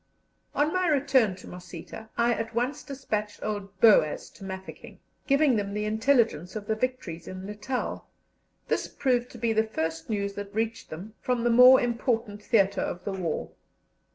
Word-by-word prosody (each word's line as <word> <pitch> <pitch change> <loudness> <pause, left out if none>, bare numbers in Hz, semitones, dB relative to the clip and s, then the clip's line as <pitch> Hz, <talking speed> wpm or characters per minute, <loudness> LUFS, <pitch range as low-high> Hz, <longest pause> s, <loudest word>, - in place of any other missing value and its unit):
On 300 +2 +2
my 370 -1 +1
return 270 - +3
to 185 - -13
Mosita 180 +4 -9
I 235 0 +3
at 225 0 -4
once 245 +4 -1
despatched 215 -7 -4
old 200 -2 -4
Boaz 200 -9 +4
to - - -14
Mafeking, 190 0 -8 0.3
giving 275 -3 +4
them 200 -1 -2
the 210 0 -1
intelligence 220 - +2
of 210 -1 -5
the 220 - 0
victories 215 -8 -3
in 185 0 -7
Natal. 210 +5 -4 0.6
This - - 0
proved 250 -2 0
to - - -11
be 230 -1 0
the 220 0 +3
first 165 -5 -3
news 200 -2 -1
that 205 0 -7
reached 225 +1 -2
them 185 +7 -8
from 250 -2 0
the 240 - +3
more 250 +2 +9
important 230 -3 -1
theatre 200 -4 +2
of 175 - -4
the 200 - -2
war. 175 -5 -3
220 Hz, 170 wpm, -27 LUFS, 200-245 Hz, 0.6 s, more